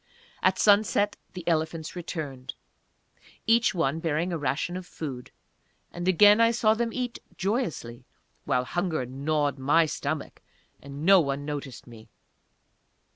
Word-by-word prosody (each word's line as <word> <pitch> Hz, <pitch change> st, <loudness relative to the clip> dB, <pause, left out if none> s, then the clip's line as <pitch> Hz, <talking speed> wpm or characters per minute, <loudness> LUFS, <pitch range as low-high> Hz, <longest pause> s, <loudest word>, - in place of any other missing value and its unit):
At -, -, +3 dB
sunset 205 Hz, 0 st, +3 dB, 0.2 s
the 180 Hz, -3 st, -9 dB
elephants 160 Hz, 0 st, -1 dB
returned, 150 Hz, -7 st, -6 dB, 0.9 s
each 225 Hz, -2 st, +3 dB
one 160 Hz, -2 st, 0 dB
bearing 165 Hz, +2 st, -1 dB
a -, -, -1 dB
ration 150 Hz, +5 st, -2 dB
of 185 Hz, -1 st, -6 dB
food; 130 Hz, -6 st, -7 dB, 0.6 s
and 175 Hz, +1 st, -5 dB
again 205 Hz, +4 st, +6 dB
I 230 Hz, -, +6 dB
saw 225 Hz, -2 st, +3 dB
them 230 Hz, +1 st, -1 dB
eat 245 Hz, 0 st, -4 dB, 0.2 s
joyously, 165 Hz, -, -3 dB, 0.4 s
while 125 Hz, 0 st, 0 dB
hunger 170 Hz, -2 st, -2 dB
gnawed 140 Hz, +2 st, -1 dB
my 150 Hz, +5 st, +4 dB
stomach 155 Hz, -, -4 dB, 0.4 s
and 140 Hz, +2 st, -7 dB
no 195 Hz, +1 st, +7 dB
one 140 Hz, -1 st, -3 dB
noticed 140 Hz, -4 st, -6 dB
me. 115 Hz, -2 st, -14 dB
160 Hz, 130 wpm, -27 LUFS, 140-195 Hz, 0.9 s, no